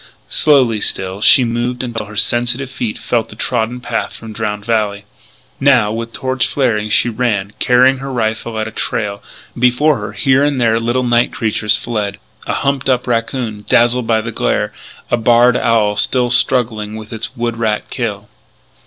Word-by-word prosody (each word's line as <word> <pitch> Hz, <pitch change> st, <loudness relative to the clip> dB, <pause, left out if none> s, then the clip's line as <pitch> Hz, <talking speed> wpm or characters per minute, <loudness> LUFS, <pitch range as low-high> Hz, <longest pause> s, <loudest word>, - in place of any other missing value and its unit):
Slowly, 130 Hz, -8 st, +3 dB
still, 95 Hz, +1 st, -2 dB
she 130 Hz, -, +6 dB
moved 120 Hz, +1 st, -2 dB
until 115 Hz, -4 st, -4 dB
her 105 Hz, -, -11 dB
sensitive 120 Hz, +5 st, 0 dB
feet 120 Hz, -5 st, -4 dB
felt 115 Hz, -2 st, -1 dB
the -, -, -12 dB
trodden 120 Hz, +1 st, -2 dB
path 120 Hz, -, -3 dB
from 110 Hz, -1 st, -9 dB
Drowned 105 Hz, -1 st, -4 dB
Valley. 105 Hz, -3 st, -1 dB, 0.5 s
Now, 130 Hz, -6 st, +3 dB
with 115 Hz, +1 st, -4 dB
torch 130 Hz, -1 st, -1 dB
flaring, 110 Hz, -6 st, 0 dB
she 115 Hz, +2 st, +3 dB
ran, 110 Hz, -4 st, -1 dB
carrying 130 Hz, +1 st, +4 dB
her 135 Hz, 0 st, -6 dB
rifle 110 Hz, -1 st, -2 dB
at 110 Hz, 0 st, -2 dB
a -, -, -7 dB
trail. 100 Hz, -3 st, -3 dB, 0.3 s
Before 125 Hz, +3 st, +2 dB
her, 105 Hz, 0 st, -6 dB
here 130 Hz, +6 st, +2 dB
and 145 Hz, -2 st, 0 dB
there, 115 Hz, -2 st, +2 dB
little 120 Hz, +2 st, 0 dB
night 120 Hz, -1 st, +2 dB
creatures 105 Hz, -1 st, 0 dB
fled 105 Hz, -3 st, -3 dB, 0.3 s
a -, -, -1 dB
humped 140 Hz, -1 st, -1 dB
up 125 Hz, -1 st, +1 dB
raccoon, 115 Hz, -2 st, -2 dB
dazzled 120 Hz, 0 st, +3 dB
by 110 Hz, -1 st, +2 dB
the 115 Hz, +1 st, -5 dB
glare, -, -, -1 dB, 0.4 s
a 120 Hz, -, +3 dB
barred 120 Hz, +1 st, +4 dB
owl 110 Hz, -4 st, +2 dB
still 125 Hz, +3 st, +2 dB
struggling 120 Hz, -4 st, +3 dB
with 110 Hz, +1 st, -9 dB
its 110 Hz, +1 st, -5 dB
wood 120 Hz, -1 st, -2 dB
rat 110 Hz, -2 st, -1 dB
kill. 105 Hz, -4 st, -4 dB
115 Hz, 170 wpm, -16 LUFS, 110-125 Hz, 0.5 s, she